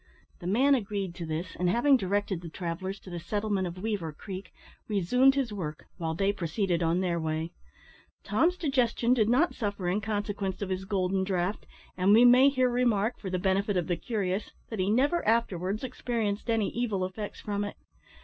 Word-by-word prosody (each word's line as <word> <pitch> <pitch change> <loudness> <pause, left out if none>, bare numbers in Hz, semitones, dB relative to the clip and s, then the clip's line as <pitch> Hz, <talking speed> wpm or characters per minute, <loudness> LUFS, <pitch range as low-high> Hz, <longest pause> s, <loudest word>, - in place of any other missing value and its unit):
The 175 - -6
man 260 +9 +4
agreed 200 -7 -1
to 170 -2 -6
this, 160 +3 -4
and 180 0 +2
having 255 +8 +4
directed 200 -4 -1
the 170 - -7
travellers 185 +4 -4
to 185 - -11
the 175 - -4
settlement 205 0 -1
of 175 +1 -7
Weaver 195 -5 -2
Creek, 185 +4 -8 0.4
resumed 250 +7 +3
his 260 -6 -1
work, 160 -6 -5
while 165 -3 -2
they 195 +3 +1
proceeded 175 0 -1
on 170 +2 +2
their 175 -2 0
way. 160 +1 -2 0.7
Tom's 360 +3 +2
digestion 250 -6 +2
did 220 -4 +2
not 290 +9 +3
suffer 200 -5 -3
in 190 +4 +1
consequence 205 -2 -2
of 195 - -4
his 190 0 -2
golden 190 -1 0
draught, 190 +1 -2 0.3
and 190 +2 +4
we 235 +2 +7
may 255 +3 +7
here 255 -2 +2
remark, 240 -3 +1
for 195 - -5
the 185 - -1
benefit 195 +2 +1
of 175 - 0
the 175 - 0
curious, 200 0 -2 0.2
that 220 - -5
he 185 +1 +1
never 280 +10 +2
afterwards 210 -3 +1
experienced 235 -4 -2
any 225 -3 +1
evil 215 -6 -1
effects 205 +3 -6
from 205 -1 -2
it. 205 - -6
200 Hz, 190 wpm, -29 LUFS, 180-230 Hz, 0.7 s, we